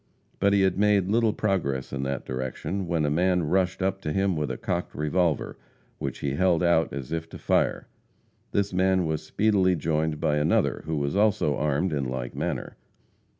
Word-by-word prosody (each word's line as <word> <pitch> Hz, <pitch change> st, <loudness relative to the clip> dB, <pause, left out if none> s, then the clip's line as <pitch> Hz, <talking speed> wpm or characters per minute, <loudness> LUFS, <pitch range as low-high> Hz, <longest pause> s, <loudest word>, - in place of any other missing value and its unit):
But 100 Hz, 0 st, +3 dB
he 100 Hz, -1 st, +4 dB
had 95 Hz, 0 st, +1 dB
made 100 Hz, -2 st, +3 dB
little 115 Hz, 0 st, +3 dB
progress 85 Hz, -13 st, -1 dB
in 70 Hz, -, -2 dB
that 70 Hz, 0 st, -3 dB
direction, 65 Hz, +9 st, -4 dB
when 85 Hz, -3 st, 0 dB
a 75 Hz, -, 0 dB
man 90 Hz, +2 st, +2 dB
rushed 95 Hz, +2 st, +1 dB
up 95 Hz, 0 st, -1 dB
to 75 Hz, -, -3 dB
him 95 Hz, +1 st, +1 dB
with 75 Hz, -1 st, -2 dB
a -, -, -3 dB
cocked 90 Hz, 0 st, -3 dB
revolver, 75 Hz, +1 st, 0 dB, 0.4 s
which -, -, -4 dB
he 70 Hz, -, -1 dB
held 90 Hz, +4 st, +2 dB
out 85 Hz, -2 st, +3 dB
as 70 Hz, -1 st, -6 dB
if 80 Hz, 0 st, -2 dB
about -, -, -29 dB
to -, -, -9 dB
fire. -, -, 0 dB, 0.6 s
This 100 Hz, -1 st, 0 dB
man 95 Hz, -1 st, +2 dB
was 80 Hz, -1 st, -1 dB
speedily 100 Hz, -4 st, +2 dB
joined 80 Hz, -1 st, -1 dB
by 75 Hz, -, +1 dB
another, 75 Hz, +1 st, +1 dB
who 80 Hz, -, -1 dB
was 70 Hz, +3 st, -1 dB
also 105 Hz, -8 st, +2 dB
armed 75 Hz, +5 st, 0 dB
in 70 Hz, -2 st, -1 dB
like 60 Hz, -1 st, -4 dB
manner. -, -, -4 dB
85 Hz, 195 wpm, -26 LUFS, 75-95 Hz, 0.6 s, he